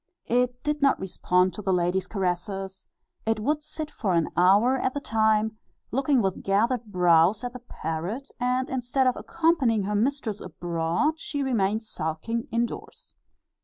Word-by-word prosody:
It 245 Hz, +1 st, 0 dB
did 300 Hz, 0 st, -1 dB
not 275 Hz, -1 st, +4 dB
respond 180 Hz, -1 st, +1 dB
to 210 Hz, -, -6 dB
the 195 Hz, -, 0 dB
lady's 180 Hz, +1 st, +1 dB
caresses; 190 Hz, 0 st, -3 dB, 0.4 s
it 225 Hz, -1 st, 0 dB
would 300 Hz, +7 st, 0 dB
sit 305 Hz, 0 st, -6 dB
for 195 Hz, -10 st, -1 dB
an 165 Hz, -1 st, +1 dB
hour 200 Hz, +9 st, +5 dB
at 260 Hz, +2 st, -1 dB
the -, -, 0 dB
time, 220 Hz, -2 st, +1 dB, 0.3 s
looking 270 Hz, -1 st, +2 dB
with 190 Hz, -1 st, -1 dB
gathered 230 Hz, +5 st, +1 dB
brows 180 Hz, +1 st, +3 dB
at 245 Hz, 0 st, -4 dB
the 250 Hz, -, -7 dB
parrot, 190 Hz, -, -5 dB
and 250 Hz, +1 st, 0 dB
instead 260 Hz, +1 st, 0 dB
of 255 Hz, -, +3 dB
accompanying 305 Hz, -11 st, +1 dB
her 205 Hz, +2 st, -2 dB
mistress 225 Hz, -1 st, -1 dB
abroad 175 Hz, -, -1 dB
she 285 Hz, -3 st, -3 dB
remained 220 Hz, -4 st, +1 dB
sulking 180 Hz, +5 st, -3 dB
in 235 Hz, +1 st, +2 dB
doors. -, -, -10 dB
220 Hz, 160 wpm, -26 LUFS, 190-255 Hz, 0.4 s, hour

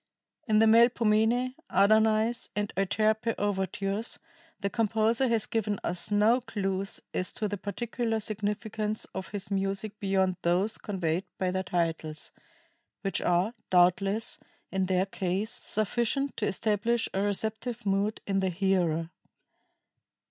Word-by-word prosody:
In 215 Hz, -1 st, +3 dB
the 220 Hz, -, +6 dB
"Melpomene," 230 Hz, +1 st, +4 dB, 0.2 s
"Adonais," 220 Hz, +4 st, +3 dB
and 205 Hz, -1 st, -2 dB
"Euterpe" 215 Hz, +4 st, +1 dB
overtures, 200 Hz, +2 st, -2 dB, 0.4 s
the 200 Hz, -, -1 dB
composer 225 Hz, +3 st, +2 dB
has 230 Hz, -2 st, +1 dB
given 210 Hz, -3 st, -1 dB
us 175 Hz, 0 st, -1 dB
no 215 Hz, +4 st, +4 dB
clews 195 Hz, -4 st, -3 dB
as 185 Hz, -, -1 dB
to 215 Hz, -, -1 dB
the 205 Hz, -, -2 dB
particular 225 Hz, +2 st, -2 dB
significance 215 Hz, 0 st, -3 dB
of 190 Hz, -, -5 dB
his 200 Hz, -1 st, -7 dB
music 195 Hz, +2 st, -2 dB
beyond 190 Hz, -2 st, +1 dB
those 185 Hz, +5 st, +1 dB
conveyed 180 Hz, -3 st, -1 dB
by 185 Hz, -1 st, 0 dB
their 185 Hz, 0 st, 0 dB
titles 165 Hz, -4 st, -2 dB, 0.7 s
which 195 Hz, -1 st, -1 dB
are, 180 Hz, +6 st, +2 dB, 0.2 s
doubtless, 195 Hz, +4 st, +3 dB, 0.3 s
in 190 Hz, -1 st, 0 dB
their 185 Hz, 0 st, +2 dB
case, 195 Hz, +2 st, -2 dB
sufficient 240 Hz, +6 st, -1 dB
to 210 Hz, -, 0 dB
establish 220 Hz, +3 st, +1 dB
a 195 Hz, -, 0 dB
receptive 220 Hz, +4 st, -3 dB
mood 200 Hz, +2 st, 0 dB
in 195 Hz, -1 st, +1 dB
the 190 Hz, -1 st, +1 dB
hearer. 175 Hz, -3 st, +1 dB
205 Hz, 125 wpm, -29 LUFS, 190-220 Hz, 0.7 s, the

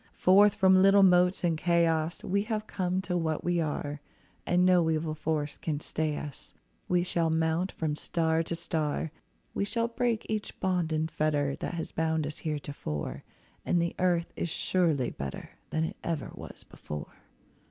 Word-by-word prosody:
Forth 200 Hz, +3 st, +6 dB
from 190 Hz, -2 st, +5 dB
little 195 Hz, +1 st, +6 dB
motes 180 Hz, 0 st, +4 dB
in 170 Hz, -2 st, +2 dB
Chaos, 165 Hz, -1 st, +1 dB
We 200 Hz, +2 st, +1 dB
have 215 Hz, -1 st, -2 dB
come 185 Hz, -2 st, -1 dB
to 180 Hz, -1 st, -2 dB
what 160 Hz, -3 st, -1 dB
we 175 Hz, 0 st, +1 dB
are; 145 Hz, -1 st, -3 dB, 0.5 s
And 180 Hz, +1 st, +3 dB
no 180 Hz, -3 st, +4 dB
evil 155 Hz, 0 st, 0 dB
force 155 Hz, -1 st, -2 dB
can 150 Hz, -3 st, -2 dB
stay 155 Hz, -1 st, -2 dB
us— 145 Hz, -2 st, -8 dB, 0.3 s
We 180 Hz, -1 st, +2 dB
shall 170 Hz, -2 st, 0 dB
mount 160 Hz, +3 st, +1 dB
from 155 Hz, -2 st, -2 dB
star 160 Hz, +1 st, 0 dB
to 165 Hz, +1 st, -3 dB
star, 160 Hz, -2 st, -2 dB, 0.4 s
We -, -, -1 dB
shall 230 Hz, +3 st, 0 dB
break 235 Hz, -1 st, -1 dB
each 215 Hz, -1 st, -4 dB
bond 180 Hz, -4 st, 0 dB
and 155 Hz, +1 st, 0 dB
fetter 145 Hz, -2 st, 0 dB
That -, -, -4 dB
has 165 Hz, -, -4 dB
bound 160 Hz, -1 st, 0 dB
us 150 Hz, 0 st, -6 dB
heretofore; 145 Hz, -, -4 dB, 0.4 s
And 175 Hz, -, +1 dB
the 170 Hz, 0 st, 0 dB
earth 175 Hz, -2 st, +1 dB
is 170 Hz, -, -2 dB
surely 160 Hz, -6 st, +1 dB
better 70 Hz, -1 st, -6 dB, 0.2 s
Than 160 Hz, -, 0 dB
it 160 Hz, -, -4 dB
ever 165 Hz, -5 st, -3 dB
was -, -, -10 dB
before. 75 Hz, -1 st, -8 dB
165 Hz, 170 wpm, -29 LUFS, 155-180 Hz, 0.5 s, Forth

